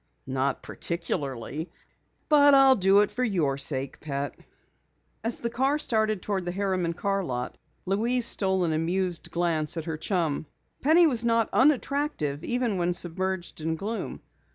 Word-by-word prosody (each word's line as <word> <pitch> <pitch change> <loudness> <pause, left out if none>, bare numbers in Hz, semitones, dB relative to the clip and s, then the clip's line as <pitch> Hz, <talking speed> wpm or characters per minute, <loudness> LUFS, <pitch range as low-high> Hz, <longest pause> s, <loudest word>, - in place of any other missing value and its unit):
"Not 135 +1 -2
particularly. 155 -3 -4 0.6
But 290 -2 +6
I'll 270 -1 +7
do 195 0 +4
it 210 - 0
for 245 +4 -2
your 170 - +1
sake, 140 -1 -2
pet." 140 -1 -4 0.9
As 230 +1 -1
the 235 - -1
car 270 +5 +1
started 220 -7 0
toward 195 -3 -2
the 175 - -3
Harriman 185 -3 -1
Car 195 +3 -1
Lot, 125 -6 -4 0.3
Louise 230 +6 +1
stole 190 -4 +3
an 165 -2 0
amused 175 +2 -1
glance 165 -2 0
at 160 - -4
her 160 -2 -4
chum. 160 -4 -1 0.3
Penny 325 +5 +5
was 245 -7 +2
not 230 -1 +2
unattractive, 270 - +1
even 245 -5 -1
when 175 0 0
submerged 180 0 -2
in 160 +1 -1
gloom. 215 +7 -5
185 Hz, 150 wpm, -26 LUFS, 160-230 Hz, 0.9 s, I'll